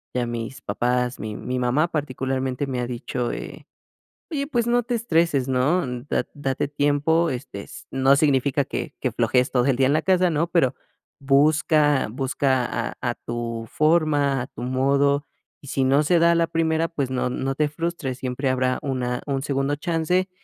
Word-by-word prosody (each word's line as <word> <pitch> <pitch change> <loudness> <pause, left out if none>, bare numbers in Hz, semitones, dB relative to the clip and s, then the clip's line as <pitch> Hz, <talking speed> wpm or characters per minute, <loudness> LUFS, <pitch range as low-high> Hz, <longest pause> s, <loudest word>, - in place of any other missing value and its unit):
Ya 125 -1 +1
mis 120 +1 -5
papás, 125 0 -1
mi 110 -1 -5
mi 125 0 -3
mamá 130 +7 +2
particularmente 130 -3 -2
me 130 -2 -3
ha 120 - -2
dicho, 125 0 -3
eh: - - -8 0.6
"Oye, 280 -2 -2
pues 240 -5 0
no 240 0 +2
te 240 +1 -2
estreses, 165 - +1
¿no? 135 +7 +2 0.2
Da- - - 0
date 135 -2 -2
tiempo, 145 +3 +2
este, 120 -6 -5
s - - -12
no 135 +1 +4
significa 140 -1 +2
que 145 - -5
que 130 - -1
flojees 120 +2 +1
todo 125 +1 +2
el 135 - +3
día 130 +1 +3
en 140 - +2
la 155 - +2
casa, 185 -1 +3
¿no? 160 +2 +1
Pero, 165 -7 +2 0.5
busca 145 0 +3
busca 130 0 0
a - - -4
a - - 0
tu 115 -1 -5
forma, 150 -4 +2
a 125 - -5
tu 120 - -9
modo, 140 +3 +1 0.3
y 140 - -13
si 135 0 0
no 135 +3 +4
se 170 +3 +3
da 170 +1 +5
a - - +3
la 165 0 +2
primera, 165 0 +1
pues 140 -6 -3
no 125 -1 0
no 135 +2 -2
te 150 +1 0
frustres, 155 -5 -3
siempre 130 +1 -2
habrá 130 0 +1
una 125 -3 -2
un 135 -1 -1
segundo 140 0 0
chance, 170 +4 0
140 Hz, 185 wpm, -23 LUFS, 130-155 Hz, 0.6 s, da